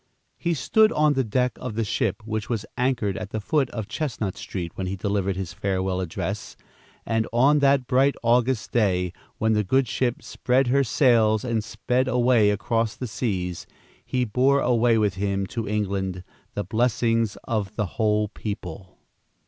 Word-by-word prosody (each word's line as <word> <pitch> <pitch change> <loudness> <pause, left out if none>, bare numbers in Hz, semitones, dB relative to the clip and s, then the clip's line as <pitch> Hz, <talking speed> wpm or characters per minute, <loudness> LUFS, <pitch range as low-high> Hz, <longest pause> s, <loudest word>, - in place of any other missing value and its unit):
He 170 -1 0
stood 215 - +3
on 150 -1 +3
the 135 -1 +1
deck 125 +3 +1
of 125 -4 -6
the 115 - 0
ship 110 0 -1
which 110 -1 -3
was 115 -3 -2
anchored 125 -6 0
at 105 - -6
the 110 - -3
foot 135 +4 0
of 110 -3 -5
Chestnut 110 -5 -3
Street, 95 -4 -5
when 95 - -4
he 95 - -2
delivered 100 0 -1
his 90 -3 -5
farewell 95 0 -1
address, 95 +3 -4 0.5
and 115 -1 0
on 135 +6 +4
that 140 -2 +3
bright 135 +2 +3
August 120 0 +2
day, 90 -6 +1 0.2
when 110 0 +2
the 105 0 +2
good 130 +6 +2
ship 120 0 -1
spread 125 +2 +1
her 140 +2 +3
sails 115 -4 +3
and 115 -3 0
sped 125 +3 -1
away 120 -4 +4
across 110 +2 0
the 130 - -5
seas, 95 -7 -3 0.4
he 125 -1 -1
bore 130 +5 +3
away 120 -3 +3
with 105 -3 +2
him 100 +1 -1
to 115 +2 -4
England 95 -3 -2 0.3
the 105 - -1
blessings 115 -1 +1
of 105 -4 -2
the 105 - 0
whole 105 +1 +1
people. 95 -4 -7
110 Hz, 170 wpm, -24 LUFS, 100-125 Hz, 0.5 s, on